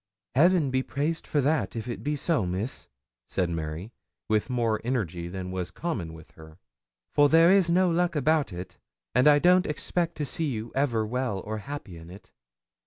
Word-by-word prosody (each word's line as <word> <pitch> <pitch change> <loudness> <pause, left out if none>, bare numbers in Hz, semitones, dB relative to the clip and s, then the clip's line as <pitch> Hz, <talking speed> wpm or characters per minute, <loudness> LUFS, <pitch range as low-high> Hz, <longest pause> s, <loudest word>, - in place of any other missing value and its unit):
'Heaven 165 0 +4
be 130 0 +2
praised 150 +5 -2
for 145 - +1
that, 135 -8 0
if 115 0 -4
it 120 - -5
be 150 +1 0
so, 150 - 0
Miss!' 95 +8 -4 0.4
said 90 -3 -1
Mary, 80 +6 -5 0.3
with 110 +3 +1
more 115 -3 0
energy 90 -9 -2
than 90 0 -5
was 90 -1 -3
common 110 - -4
with 80 -1 -14
her, 80 0 -15 0.6
'for 145 0 +5
there 165 +3 +6
is 190 -3 +4
no 180 +1 +3
luck 175 0 +1
about 150 -2 +2
it, 90 +1 -8 0.3
and 125 +3 +4
I 145 -1 +7
don't 180 +4 +4
expect 170 +3 -2
to 150 - -2
see 155 +3 -2
you 115 -2 -4
ever 120 -5 +1
well 120 -3 -2
or 110 +2 -5
happy 120 - -7
in 80 +1 -12
it.' 95 +3 -13
125 Hz, 185 wpm, -27 LUFS, 95-155 Hz, 0.6 s, I